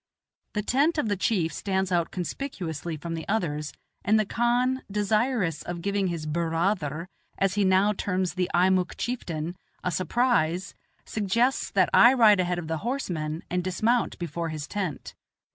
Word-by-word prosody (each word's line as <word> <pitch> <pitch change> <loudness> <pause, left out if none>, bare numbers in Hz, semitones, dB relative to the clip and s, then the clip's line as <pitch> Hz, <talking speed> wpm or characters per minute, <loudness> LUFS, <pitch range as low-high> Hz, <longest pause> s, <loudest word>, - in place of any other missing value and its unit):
The 210 - 0
tent 285 +9 +2
of 245 -8 0
the 205 - +1
chief 185 -4 0
stands 190 -1 -1
out 170 -2 +1
conspicuously 175 - -4
from 165 +2 -5
the 160 -1 -5
others, 150 -8 -1 0.3
and 215 +2 +4
the 215 - +2
khan, 245 +4 +1
desirous 210 - 0
of 175 -1 -6
giving 200 -1 0
his 170 -3 -3
"bur 165 +2 -1
raa 170 +5 +2
ther," 160 -2 -5 0.3
as 195 -1 +1
he 205 0 +2
now 190 +2 +4
terms 185 -2 -1
the 180 -1 -1
Eimuck 185 0 +2
chieftain, 175 -9 -3 0.3
a 180 - 0
surprise, 185 -1 +1 0.3
suggests 230 +5 +1
that - - +2
I 240 +2 +8
ride 215 -5 +6
ahead 180 -1 0
of 170 -2 -5
the 160 0 -1
horsemen 170 - -3
and 180 0 -1
dismount 220 +7 +1
before 170 0 -3
his 155 -2 -5
tent. 185 -8 -4
185 Hz, 165 wpm, -26 LUFS, 165-215 Hz, 0.3 s, I